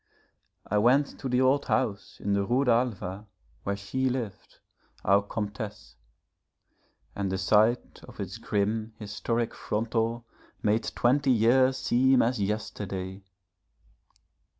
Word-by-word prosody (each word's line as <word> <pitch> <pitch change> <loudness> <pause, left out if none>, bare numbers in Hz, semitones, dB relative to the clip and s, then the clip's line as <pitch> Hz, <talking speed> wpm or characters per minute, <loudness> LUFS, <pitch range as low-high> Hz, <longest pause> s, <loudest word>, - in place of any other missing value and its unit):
I 105 - +1
went 130 +6 +3
to 135 - -4
the 125 +1 +2
old 130 +2 +3
house 110 -6 -1
in 100 - -1
the 100 0 +2
Rue 125 +7 +1
d'Alva 110 -5 0 0.3
where 100 - -2
she 130 +7 -1
lived, 120 -6 -5 0.5
our 100 +1 +5
Comtesse. 105 0 -6 1.2
And 100 -2 -2
the 95 - -1
sight 110 +5 +2
of - - -15
its - - -5
grim, 110 +2 -1
historic 115 +2 -2
frontal 115 +2 -2 0.4
made 110 +1 +2
twenty 135 +3 +2
years 130 +3 +4
seem 130 0 +3
as 120 -2 0
yesterday. 100 -2 -3
110 Hz, 120 wpm, -28 LUFS, 100-125 Hz, 1.2 s, our